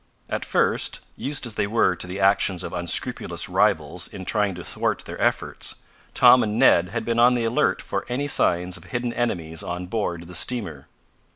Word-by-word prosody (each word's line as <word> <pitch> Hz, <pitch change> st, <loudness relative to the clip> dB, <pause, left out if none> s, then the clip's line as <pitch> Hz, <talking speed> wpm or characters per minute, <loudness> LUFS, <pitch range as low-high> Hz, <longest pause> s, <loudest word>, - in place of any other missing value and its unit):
At -, -, -2 dB
first, -, -, +1 dB, 0.2 s
used 140 Hz, -1 st, -2 dB
as 120 Hz, -, -4 dB
they 100 Hz, -, -1 dB
were 105 Hz, -4 st, +2 dB
to 90 Hz, -, -3 dB
the 90 Hz, +2 st, -6 dB
actions 95 Hz, -2 st, +2 dB
of -, -, -6 dB
unscrupulous -, -, +1 dB
rivals -, -, 0 dB
in 95 Hz, -2 st, -9 dB
trying 105 Hz, -3 st, 0 dB
to 90 Hz, -, -8 dB
thwart -, -, -2 dB
their -, -, -8 dB
efforts, -, -, 0 dB, 0.4 s
Tom 125 Hz, -, +7 dB
and 105 Hz, 0 st, -2 dB
Ned 90 Hz, -8 st, +4 dB
had 115 Hz, +2 st, -4 dB
been 115 Hz, 0 st, 0 dB
on 125 Hz, +1 st, +5 dB
the 120 Hz, -1 st, -1 dB
alert 115 Hz, +1 st, +1 dB
for -, -, -4 dB
any 135 Hz, +4 st, -2 dB
signs 90 Hz, -8 st, +1 dB
of 85 Hz, -, -15 dB
hidden 120 Hz, +5 st, -3 dB
enemies 85 Hz, -9 st, -2 dB
on 90 Hz, +1 st, -5 dB
board 90 Hz, -4 st, -3 dB
the 90 Hz, -, -11 dB
steamer. 90 Hz, -, 0 dB
100 Hz, 190 wpm, -23 LUFS, 90-120 Hz, 0.4 s, Tom